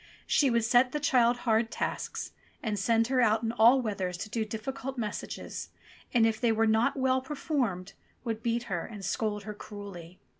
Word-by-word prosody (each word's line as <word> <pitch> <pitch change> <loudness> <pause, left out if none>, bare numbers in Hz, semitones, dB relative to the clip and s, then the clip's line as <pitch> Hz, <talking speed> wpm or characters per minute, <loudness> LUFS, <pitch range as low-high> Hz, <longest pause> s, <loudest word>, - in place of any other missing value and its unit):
She 280 - +3
would 235 -1 +2
set 245 +2 +4
the 300 - 0
child 250 -5 +3
hard 225 -1 +3
tasks, - - -3 0.3
and 215 -4 -1
send 230 +3 +3
her 260 -1 +3
out 220 -1 +3
in 225 - 0
all 240 +3 +5
weathers 190 -5 -2
to 210 +3 -6
do 225 - 0
difficult 255 +5 -5
messages, 215 -3 -5 0.4
and 235 -2 +4
if 225 0 0
they 235 -2 +3
were 225 0 +2
not 220 +4 +2
well 260 0 +2
performed 255 - -2 0.3
would 225 -2 -3
beat 235 +1 0
her 190 -8 -3
and 205 -4 -8
scold 210 +1 -1
her 210 +1 -6
cruelly. 200 -5 -10
225 Hz, 185 wpm, -29 LUFS, 210-245 Hz, 0.4 s, all